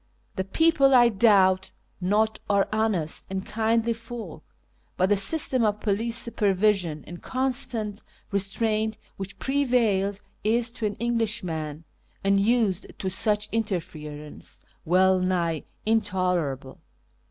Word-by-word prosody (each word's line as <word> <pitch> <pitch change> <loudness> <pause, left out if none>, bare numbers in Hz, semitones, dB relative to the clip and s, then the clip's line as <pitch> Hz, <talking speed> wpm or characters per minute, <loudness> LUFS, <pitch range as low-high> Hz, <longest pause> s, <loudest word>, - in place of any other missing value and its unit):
The 190 - -1
people, 275 - +3
I 240 -1 +7
doubt 195 -3 +4 0.3
not, 215 +4 +1
are 200 -1 +3
honest 210 -8 0
and 190 0 -4
kindly 230 +1 +1
folk, 225 -8 -9 0.5
but 185 +1 +2
the 205 - +4
system 255 +4 +3
of 210 -1 +1
police 225 +3 -1
supervision 195 -8 +1
and 175 0 -10
constant 240 -5 -1 0.3
restraint 215 +2 0 0.2
which 195 +1 -7
prevails 235 -8 +1 0.2
is, 230 +2 +1
to 230 -3 -2
an 205 - -4
Englishman 190 -10 -2 0.4
unused 200 0 +2
to 190 - -3
such 210 +2 +1
interference, 155 -8 -5 0.3
well 185 +2 +4
nigh 175 -4 -1 0.2
intolerable. 180 - -1
205 Hz, 110 wpm, -25 LUFS, 185-225 Hz, 0.5 s, I